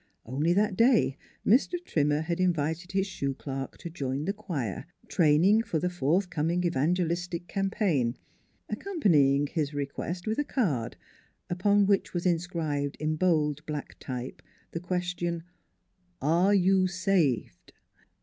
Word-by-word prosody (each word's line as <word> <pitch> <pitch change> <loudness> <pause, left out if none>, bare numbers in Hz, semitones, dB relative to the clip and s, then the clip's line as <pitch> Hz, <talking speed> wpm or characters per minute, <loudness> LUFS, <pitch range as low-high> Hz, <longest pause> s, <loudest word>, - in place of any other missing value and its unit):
Only 145 +8 0
that 205 0 +2
day 230 - +4 0.3
Mr. 255 - +4
Trimmer 150 -1 +1
had 170 +2 -2
invited 170 -1 0
his 195 0 +1
shoe 140 -8 -3
clerk 135 -1 -6
to 170 - -7
join 140 -2 -3
the 195 - 0
choir, 155 - -4 0.2
training 175 +7 +4
for 210 -7 -2
the 180 +3 -1
forthcoming 175 +1 0
evangelistic 175 +2 0
campaign, 195 - 0 0.5
accompanying 150 - +2
his 150 -1 -2
request 145 +5 -4
with 220 +3 -1
a - - +3
card, 155 - -1 0.5
upon 200 +3 +3
which 195 -2 +1
was 175 - -2
inscribed 165 -5 -1
in 155 0 -1
bold 155 -4 +1
black 150 -2 -5
type 125 -1 -6 0.3
the 165 - -3
question: 175 -1 -2 0.4
" 180 -1 -43 0.2
Are 200 +3 +4
you 190 0 +4
saved 180 - 0
170 Hz, 130 wpm, -28 LUFS, 145-185 Hz, 0.5 s, day